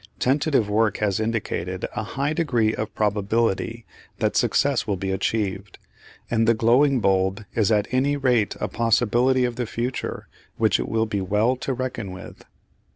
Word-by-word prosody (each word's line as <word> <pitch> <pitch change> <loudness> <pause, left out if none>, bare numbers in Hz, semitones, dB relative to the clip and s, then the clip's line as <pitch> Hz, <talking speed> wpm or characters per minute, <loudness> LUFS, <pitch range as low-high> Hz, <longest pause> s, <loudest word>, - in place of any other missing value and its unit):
Tentative 135 -3 +1
work 105 0 +1
has 105 -1 0
indicated 100 -5 -2
a - - -1
high 140 +7 -2
degree 120 -10 +1
of 110 0 -5
probability 110 +2 0 0.3
that - - 0
success 140 -4 +2
will 100 -2 0
be 95 +1 -3
achieved, 100 0 -2 0.5
and 115 -1 +1
the 115 - +4
glowing 125 +5 +3
bulb 95 +2 +1
is 110 -1 +1
at 105 -1 +2
any 140 +3 +1
rate 125 -6 +1
a - - -1
possibility 120 +3 +2
of 120 -1 -3
the 120 -2 -2
future 120 +4 -4 0.3
which - - +2
it - - -3
will 110 0 +1
be 105 -2 -2
well 105 +7 +1
to 135 - -3
reckon 125 -6 -4
with. 95 - -11
115 Hz, 160 wpm, -23 LUFS, 105-125 Hz, 0.5 s, the